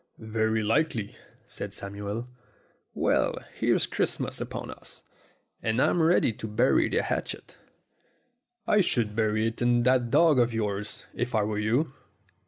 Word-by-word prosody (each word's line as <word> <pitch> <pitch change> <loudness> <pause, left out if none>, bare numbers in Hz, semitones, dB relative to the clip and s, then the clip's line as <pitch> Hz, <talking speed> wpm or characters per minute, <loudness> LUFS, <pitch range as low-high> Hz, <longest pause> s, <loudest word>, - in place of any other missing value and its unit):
"Very 110 0 0
likely," 115 -2 0 0.3
said 100 -1 -6
Samuel. 100 +4 -5 0.7
"Well, - - +1 0.2
here's - - +2
Christmas - - -2
upon - - -5
us, - - -11 0.6
and 110 +1 0
I'm 170 - +3
ready 160 -7 +3
to 110 - -7
bury 115 +5 +3
the - - +1
hatchet." - - -4 1.1
"I 210 - +4
should 115 - 0
bury 110 0 +1
it 115 +1 -3
in 120 0 +3
that 125 -1 +3
dog 155 0 +5
of 120 -1 +2
yours, 105 -1 -3
if 125 0 -2
I 105 - +3
were 105 0 -2
you." 125 +8 +1
115 Hz, 140 wpm, -27 LUFS, 105-125 Hz, 1.1 s, dog